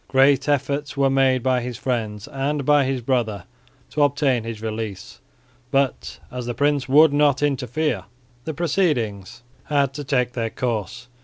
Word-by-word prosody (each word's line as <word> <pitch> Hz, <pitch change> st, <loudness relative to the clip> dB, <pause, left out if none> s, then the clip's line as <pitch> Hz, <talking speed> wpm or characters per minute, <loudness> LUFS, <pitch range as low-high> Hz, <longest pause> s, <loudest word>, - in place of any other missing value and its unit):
Great 135 Hz, +1 st, +3 dB
efforts 145 Hz, +1 st, -1 dB
were 135 Hz, -1 st, +3 dB
made 130 Hz, -2 st, +2 dB
by 130 Hz, -1 st, +2 dB
his 120 Hz, -1 st, -5 dB
friends 110 Hz, -4 st, -3 dB
and 140 Hz, 0 st, -2 dB
by 145 Hz, -1 st, +4 dB
his 130 Hz, -1 st, -1 dB
brother 115 Hz, -6 st, -1 dB, 0.5 s
to 150 Hz, -, -1 dB
obtain 140 Hz, -4 st, +2 dB
his 115 Hz, -1 st, -6 dB
release; 110 Hz, -3 st, -6 dB, 0.5 s
but, 135 Hz, -1 st, 0 dB
as 125 Hz, -1 st, -5 dB
the 120 Hz, -, -3 dB
prince 145 Hz, -2 st, +1 dB
would 150 Hz, +2 st, +6 dB
not 145 Hz, -1 st, +3 dB
interfere, 135 Hz, -, -1 dB, 0.4 s
the 160 Hz, -, -3 dB
proceedings 130 Hz, -, -1 dB, 0.2 s
had 140 Hz, -2 st, +1 dB
to 145 Hz, -, -6 dB
take 125 Hz, -3 st, 0 dB
their 115 Hz, -2 st, -2 dB
course. 115 Hz, -1 st, -3 dB
130 Hz, 155 wpm, -22 LUFS, 120-145 Hz, 0.5 s, would